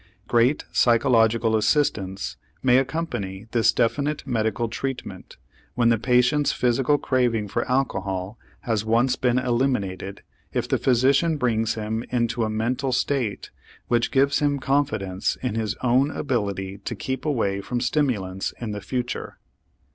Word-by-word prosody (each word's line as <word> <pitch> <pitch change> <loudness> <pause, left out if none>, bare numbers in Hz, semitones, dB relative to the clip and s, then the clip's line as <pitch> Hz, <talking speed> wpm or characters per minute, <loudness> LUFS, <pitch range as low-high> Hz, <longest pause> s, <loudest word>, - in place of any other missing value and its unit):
Great 120 +5 +3
psychological 115 -2 +3
assistance 105 -5 0 0.3
may 130 0 +5
accompany 120 - -3
this 115 -2 +4
definite 145 +5 0
medical 115 -2 0
treatment 130 +3 -6 0.4
when 120 -1 +3
the 115 - +3
patient's 125 +5 +3
physical 125 +4 +2
craving 120 -6 0
for 100 - -2
alcohol 95 -5 -1 0.2
has 110 -3 -1
once 115 +4 +2
been 125 -1 +1
eliminated 120 -7 -1 0.3
if - - -1
the - - 0
physician 135 +6 +3
brings 115 -4 0
him 110 +1 -3
into 120 -1 0
a 110 - 0
mental 120 +5 -1
state 125 -4 -1 0.4
which 120 -1 +2
gives 140 +1 +2
him 145 -1 +1
confidence 110 -9 -1
in 125 - -1
his 110 -2 -2
own 130 +3 +3
ability 100 -10 -2
to 115 - -5
keep 130 +5 -4
away 105 -10 0
from 120 +4 -3
stimulants 120 -8 -1
in 115 -3 -4
the 105 0 -5
future. 120 +4 -4
120 Hz, 135 wpm, -24 LUFS, 110-130 Hz, 0.4 s, may